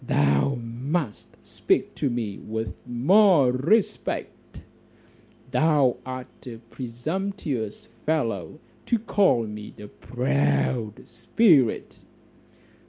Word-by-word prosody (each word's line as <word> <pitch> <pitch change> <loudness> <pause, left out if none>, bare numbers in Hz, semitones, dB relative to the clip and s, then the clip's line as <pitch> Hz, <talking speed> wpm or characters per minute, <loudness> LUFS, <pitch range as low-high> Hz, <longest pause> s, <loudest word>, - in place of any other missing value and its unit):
"Thou 70 - +2
must 120 +3 -4 0.2
speak - - 0
to 140 - -1
me 115 -5 -4
with 110 -2 -4
more 150 - +4
respect; 165 - -1 0.9
thou 140 -1 +3
art 130 0 -9
a 115 -2 -7
presumptuous 130 - -4 0.2
fellow 115 - -1 0.3
to 235 - +2
call 200 - +2
me 105 0 -8
a 105 - -9
proud 70 - -1
spirit." 130 - +2
125 Hz, 90 wpm, -25 LUFS, 110-155 Hz, 0.9 s, more